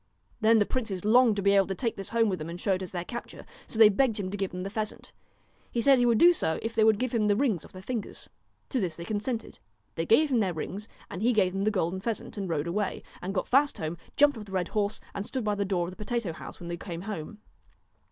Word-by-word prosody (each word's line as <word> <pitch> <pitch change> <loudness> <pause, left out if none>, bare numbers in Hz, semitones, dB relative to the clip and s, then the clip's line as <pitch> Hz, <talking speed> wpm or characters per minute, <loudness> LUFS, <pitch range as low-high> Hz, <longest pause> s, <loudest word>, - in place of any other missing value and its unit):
Then 225 0 +5
the 205 - +4
princes 205 -7 -3
longed 235 0 +5
to 200 - -2
be 200 - +5
able 195 -2 +4
to 195 - -3
take 230 +3 -2
this 195 - -3
home 230 -1 +2
with 185 -3 -1
them 155 +1 -5
and 170 +1 -6
show 195 +1 +1
it 185 - -2
as 185 - -6
their 175 -1 -4
capture. 240 +4 -7 0.2
So - - -5
they 220 -1 +9
begged 215 +1 +2
him 185 -2 -3
to - - -3
give 195 -2 -2
them 180 0 -5
the 195 - -5
pheasant. 215 -1 -5 0.6
He 235 - -1
said 270 +2 +5
he 245 - +4
would 235 -2 +4
do 350 +6 +7
so 160 - 0
if 225 0 -3
they 225 -1 +3
would 220 -1 +5
give 250 +2 -2
him 215 -3 +2
the 205 - +4
rings 220 - +1
off - - -14
their 185 0 -11
fingers. 230 -1 -5 0.4
To 260 - 0
this 175 -7 -2
they 170 - -7
consented. 220 +3 -3 0.3
They - - -3
gave 310 -9 +5
him 245 - +3
their 190 -5 0
rings, 195 +7 -5 0.2
and 180 - -5
he 240 +3 +3
gave 190 -4 +2
them 195 +1 -1
the - - +4
golden 185 -3 -1
pheasant 225 +3 -4
and 195 -3 -4
rode 155 -2 -1
away, 195 +4 -2 0.2
and 185 - -3
got 190 -2 -2
fast 285 +3 +3
home, 160 +1 -3 0.2
jumped 285 -4 +5
off 210 - -8
the 195 - -13
red 180 -2 -1
horse, 205 -1 -1
and 200 - -3
stood 255 +3 -4
by 210 -1 +1
the 200 0 -1
door 185 -3 0
of 175 - -6
the 185 - -8
potato 235 -6 -2
house - - -10
when 175 - -8
they 170 0 -4
came 170 -2 -6
home. 200 0 -6
205 Hz, 280 wpm, -28 LUFS, 185-230 Hz, 0.6 s, they